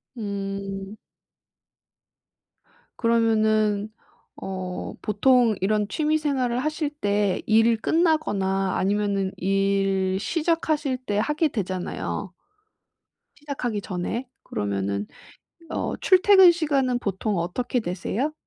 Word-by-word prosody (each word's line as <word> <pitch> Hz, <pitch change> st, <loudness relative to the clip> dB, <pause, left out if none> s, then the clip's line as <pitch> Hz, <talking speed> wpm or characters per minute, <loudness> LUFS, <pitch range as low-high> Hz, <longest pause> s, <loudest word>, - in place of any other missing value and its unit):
음. 195 Hz, -1 st, -5 dB, 2.0 s
그러면은 215 Hz, -2 st, +2 dB, 0.5 s
어 185 Hz, -1 st, -5 dB
보통 230 Hz, +1 st, +3 dB
이런 210 Hz, +1 st, +1 dB
취미생활을 285 Hz, -4 st, 0 dB
하실 305 Hz, +1 st, -1 dB
때 205 Hz, -8 st, 0 dB
일 225 Hz, +1 st, +4 dB
끝나거나 205 Hz, -, +1 dB
아니면은 200 Hz, -1 st, 0 dB
일 195 Hz, 0 st, +1 dB
시작하실 310 Hz, 0 st, 0 dB
때 205 Hz, 0 st, -1 dB
하게 300 Hz, +8 st, +1 dB
되잖아요. 190 Hz, -3 st, -4 dB, 1.0 s
시작하기 255 Hz, -8 st, -4 dB
전에 200 Hz, +8 st, -4 dB, 0.2 s
그러면은 100 Hz, 0 st, -2 dB, 0.6 s
어 -, -, -2 dB
출퇴근 375 Hz, -1 st, +6 dB
시간은 275 Hz, -7 st, 0 dB
보통 200 Hz, -1 st, -2 dB
어떻게 240 Hz, +8 st, -1 dB
되세요? 215 Hz, -, -2 dB
215 Hz, 210 characters per minute, -24 LUFS, 195-270 Hz, 2.0 s, 출퇴근